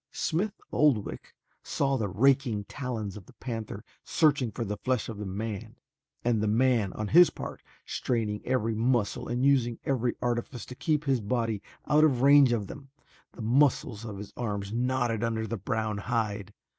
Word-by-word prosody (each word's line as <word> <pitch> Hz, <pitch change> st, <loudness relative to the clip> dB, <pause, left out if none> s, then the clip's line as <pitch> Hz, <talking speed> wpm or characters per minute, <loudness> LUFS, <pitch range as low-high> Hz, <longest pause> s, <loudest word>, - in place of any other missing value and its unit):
Smith 200 Hz, +6 st, -1 dB
Oldwick 135 Hz, -9 st, +1 dB, 0.3 s
saw 135 Hz, -1 st, 0 dB
the 110 Hz, -5 st, -1 dB
raking 120 Hz, +1 st, +2 dB
talons 110 Hz, -4 st, -5 dB
of 100 Hz, -4 st, -11 dB
the -, -, -16 dB
panther 110 Hz, -4 st, -6 dB, 0.2 s
searching 145 Hz, -6 st, +2 dB
for 115 Hz, +3 st, -4 dB
the 105 Hz, 0 st, -3 dB
flesh 130 Hz, +1 st, -1 dB
of 110 Hz, -3 st, -6 dB
the 105 Hz, -, -4 dB
man 100 Hz, +1 st, -5 dB, 0.5 s
and 115 Hz, -3 st, +2 dB
the 110 Hz, -, +1 dB
man 115 Hz, -2 st, +2 dB
on 105 Hz, -1 st, -4 dB
his 175 Hz, +2 st, +8 dB
part -, -, -7 dB, 0.2 s
straining 110 Hz, -4 st, -1 dB
every 115 Hz, -3 st, 0 dB
muscle 115 Hz, -1 st, 0 dB
and 120 Hz, +2 st, 0 dB
using 125 Hz, -4 st, +3 dB
every 125 Hz, -3 st, 0 dB
artifice 120 Hz, -1 st, -2 dB
to -, -, -9 dB
keep 150 Hz, +3 st, 0 dB
his 135 Hz, -4 st, +1 dB
body 115 Hz, -1 st, -1 dB, 0.2 s
out 150 Hz, +1 st, +4 dB
of 130 Hz, -5 st, +3 dB
range 140 Hz, -2 st, +7 dB
of 110 Hz, -4 st, 0 dB
them. 135 Hz, +7 st, -10 dB, 0.4 s
The 115 Hz, -, -8 dB
muscles 125 Hz, -2 st, +2 dB
of 110 Hz, -3 st, -6 dB
his 100 Hz, +1 st, -9 dB
arms 100 Hz, -3 st, -3 dB
knotted 120 Hz, -2 st, 0 dB
under 115 Hz, -1 st, -1 dB
the 110 Hz, -, -3 dB
brown 110 Hz, +1 st, -2 dB
hide. 105 Hz, -3 st, -2 dB
115 Hz, 170 wpm, -28 LUFS, 105-130 Hz, 0.5 s, his